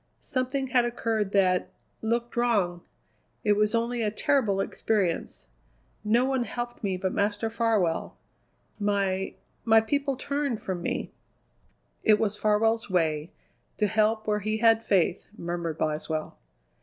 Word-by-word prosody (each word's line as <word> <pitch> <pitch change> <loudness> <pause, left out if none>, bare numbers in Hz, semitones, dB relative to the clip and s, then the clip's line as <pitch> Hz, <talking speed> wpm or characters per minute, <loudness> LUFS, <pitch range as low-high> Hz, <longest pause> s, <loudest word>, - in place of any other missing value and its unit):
Something 260 +1 -2
had 250 -2 +4
occurred 225 -4 -1
that 185 -2 +3 0.3
looked 235 +2 -1
wrong. 205 -8 +1 0.6
It 210 - +4
was 210 +2 +2
only 235 +1 0
a 215 - +1
terrible 210 -2 +1
experience. 195 - -1 0.6
No 230 +4 +3
one 265 -2 +1
helped 240 +2 -5
me 190 -2 0
but 185 0 -2
Master 205 +2 0
Farwell. 220 -7 0 0.6
My 195 -2 0 0.3
my 225 -1 +6
people 275 +4 -1
turned 280 -5 -2
from 185 -2 -4
me." - - -3 0.9
"It 215 -2 +5
was 210 -1 0
Farwell's 220 +2 +1
way: 160 -3 +1 0.5
to 210 - +2
help 215 +1 +1
where 210 -1 +1
he 215 +2 -1
had 225 0 +4
faith," 190 -6 +1
murmured 170 -2 -3
Boswell. 155 0 -2
215 Hz, 130 wpm, -27 LUFS, 190-235 Hz, 0.9 s, my